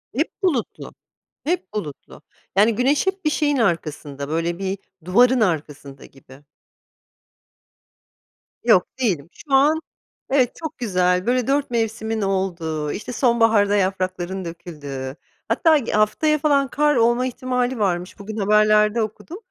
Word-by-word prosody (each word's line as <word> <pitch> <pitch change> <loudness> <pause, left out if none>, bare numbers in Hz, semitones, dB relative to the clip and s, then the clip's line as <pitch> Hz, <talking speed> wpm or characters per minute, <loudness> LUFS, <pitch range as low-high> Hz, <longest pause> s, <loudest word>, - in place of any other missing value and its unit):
Hep 305 +5 0
bulutlu, 285 - -2 0.5
hep 315 - -2
bulutlu. 150 -9 -7 0.3
Yani, 215 +3 +4
güneş 275 - +1
hep 380 -2 -2
bir 305 - +2
şeyin 290 -1 +1
arkasında, 155 - -2
böyle 165 +2 -1
bir 195 0 -3 0.3
duvarın 245 +7 +4
arkasında 150 -7 -2
gibi. 135 +1 -17 2.2
Yok - - +4
değilim. 175 - -1
Şu 280 - -9
an 300 +4 +4 0.5
evet, 260 -3 +2
çok 315 -1 -7
güzel 180 -5 +1
böyle 250 -1 +1
4 275 -1 0
mevsimin 225 -1 -1
olduğu 170 -6 -2
işte 215 +4 -6
sonbaharda 225 -5 +3
yaprakların 185 -1 -2
döküldüğü 145 -6 -7 0.3
hatta 325 -2 +4
ı 270 -6 -1
haftaya 215 +9 +2
falan 285 -2 +2
kar 295 +2 +2
olma 240 +1 +3
ihtimali 250 -1 -2
varmış 180 -3 -1
-bugün 215 +2 -7
haberlerde 210 +2 +3
okudum 220 - -6
215 Hz, 125 wpm, -21 LUFS, 180-255 Hz, 2.2 s, Yani